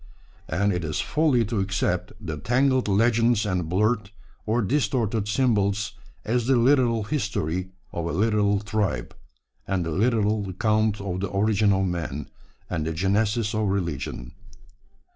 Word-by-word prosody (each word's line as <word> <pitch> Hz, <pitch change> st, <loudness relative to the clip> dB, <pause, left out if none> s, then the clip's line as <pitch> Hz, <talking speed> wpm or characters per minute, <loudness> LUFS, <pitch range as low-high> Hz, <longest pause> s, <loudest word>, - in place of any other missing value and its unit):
And 100 Hz, +1 st, +1 dB
it 90 Hz, -1 st, -2 dB
is 75 Hz, -1 st, -2 dB
folly 145 Hz, -7 st, +2 dB
to 110 Hz, 0 st, -2 dB
accept 95 Hz, -2 st, -1 dB
the 80 Hz, -8 st, -5 dB
tangled 130 Hz, -, +1 dB
legends 115 Hz, +2 st, +3 dB
and 90 Hz, -5 st, -1 dB
blurred 105 Hz, +2 st, +1 dB, 0.4 s
or 115 Hz, +2 st, +1 dB
distorted 115 Hz, -3 st, 0 dB
symbols 105 Hz, -3 st, +1 dB, 0.3 s
as 120 Hz, +1 st, 0 dB
the 135 Hz, -, +4 dB
literal 120 Hz, -2 st, +3 dB
history 95 Hz, -, -2 dB, 0.2 s
of 85 Hz, -1 st, -3 dB
a -, -, -2 dB
literal 100 Hz, +2 st, +2 dB
tribe, 100 Hz, -, -2 dB, 0.5 s
and 95 Hz, -3 st, 0 dB
the 80 Hz, -, -3 dB
literal 105 Hz, +1 st, +1 dB
account 105 Hz, +2 st, +1 dB
of 95 Hz, -2 st, -3 dB
the 100 Hz, -, -1 dB
origin 105 Hz, +1 st, +2 dB
of 95 Hz, 0 st, +2 dB
man, 75 Hz, -6 st, -4 dB, 0.4 s
and 80 Hz, -1 st, -2 dB
the 80 Hz, -, -1 dB
genesis 105 Hz, +5 st, +1 dB
of 110 Hz, -1 st, 0 dB
religion. 85 Hz, -10 st, -3 dB
105 Hz, 145 wpm, -25 LUFS, 95-115 Hz, 0.5 s, the